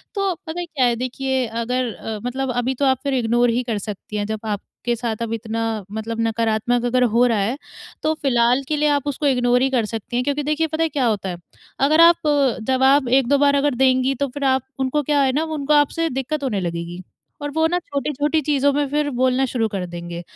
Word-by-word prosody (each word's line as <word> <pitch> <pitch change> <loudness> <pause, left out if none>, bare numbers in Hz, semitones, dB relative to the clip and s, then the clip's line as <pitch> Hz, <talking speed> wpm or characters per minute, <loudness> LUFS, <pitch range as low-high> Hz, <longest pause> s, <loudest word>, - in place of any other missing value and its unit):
तो 395 -2 0
पता 320 +2 -4
है 350 - -3
क्या 290 -7 0
है, 240 -1 +2
देखिए 260 +1 -1
अगर 235 +1 -2
अ, 220 -1 -6
मतलब 260 +1 -2
अभी 250 +2 0
तो 280 - 0
आप 260 -2 +2
फिर 280 -1 -1
इग्नोर 240 0 +2
ही 240 +2 0
कर 230 -3 -2
सकती 210 0 -7
हैं 205 - -1
जब 220 0 -3
आपके 220 +3 -3
साथ 230 -1 -2
अब 230 -1 -2
इतना 225 0 -4 0.3
मतलब 220 +1 -4
नकारात्मक 230 +1 0
अगर 250 +1 +2
हो 235 +2 +4
रहा 230 -2 +1
है। 220 +7 -1 0.5
तो 310 - +2
फिलहाल 245 -1 +2
के 305 - 0
लिए 300 +1 +2
आप 285 0 -3
उसको 285 +1 -1
इग्नोर 245 -2 +2
ही 265 - +2
कर 240 -4 +1
सकती 225 +2 -6
हैं 250 - +1
क्योंकि 285 +2 -1
देखिए 305 +2 0
पता 315 +1 -1
है 325 - +1
क्या 275 -4 0
होता 210 -4 0
है, 175 - -5 0.4
अगर 305 +4 +4
आप 335 0 +6 0.5
जवाब 265 +1 +4
1-2 265 +2 +3
बार 285 0 +3
अगर 280 -1 +1
देंगी, 260 +1 +2
तो 280 +2 -1
फिर 285 +3 -6
आप 265 -1 +2 0.2
उनको 265 +3 0
क्या 290 0 +2
है 265 -1 +3
ना 300 +4 +1 0.2
उनको 285 +2 +1
आपसे 300 +3 +2
दिक्कत 285 +2 -3
होने 230 -7 -1
लगेगी 170 0 -4 0.4
और 290 - -3
वो 320 +2 +1
ना 350 +2 0
छोटे-छोटी 295 0 -1
चीज़ों 285 -1 +2
में 290 0 0
फिर 295 +1 0
बोलना 260 +1 +2
शुरू 235 -3 -1
कर 195 -3 -4
देंगे 170 0 -7
260 Hz, 225 wpm, -21 LUFS, 230-285 Hz, 0.5 s, आप